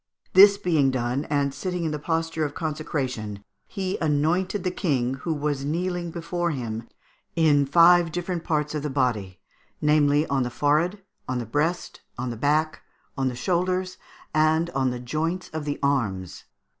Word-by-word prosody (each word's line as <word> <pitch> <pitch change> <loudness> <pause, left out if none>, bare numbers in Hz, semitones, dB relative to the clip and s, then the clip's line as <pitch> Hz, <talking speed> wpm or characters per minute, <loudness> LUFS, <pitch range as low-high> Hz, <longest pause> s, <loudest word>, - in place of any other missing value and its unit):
This 200 +2 +8
being 155 -8 +2
done, 130 +2 -1
and 140 -2 0
sitting 180 +4 -3
in 160 - -1
the 150 - -3
posture 165 +1 -1
of 145 -1 -3
consecration, 130 - -3 0.2
he 190 -2 -3
anointed 165 +6 +1
the 185 - 0
King, 130 -9 0
who 135 +5 -4
was 145 -2 -1
kneeling 175 +3 -2
before 170 +1 -2
him, 115 -6 -4 0.5
in 145 -4 +4
five 170 +2 +6
different 175 0 -3
parts 150 -2 -1
of 150 - -2
the 150 - -3
body, 115 -9 -1 0.4
namely, 150 0 +3
on 140 -3 0
the 125 - -1
forehead, 160 - +1 0.3
on 130 - -1
the 120 - -3
breast, 150 +10 -2 0.2
on 125 0 -3
the - - -5
back, 150 +6 0 0.3
on 135 -1 0
the 125 - -2
shoulders, 185 +6 -1 0.3
and 160 +2 +2
on 135 -3 +1
the 125 0 -4
joints 160 +8 -2
of 160 -2 -5
the 145 -1 -2
arms. 105 -11 -1
150 Hz, 165 wpm, -25 LUFS, 135-170 Hz, 0.5 s, This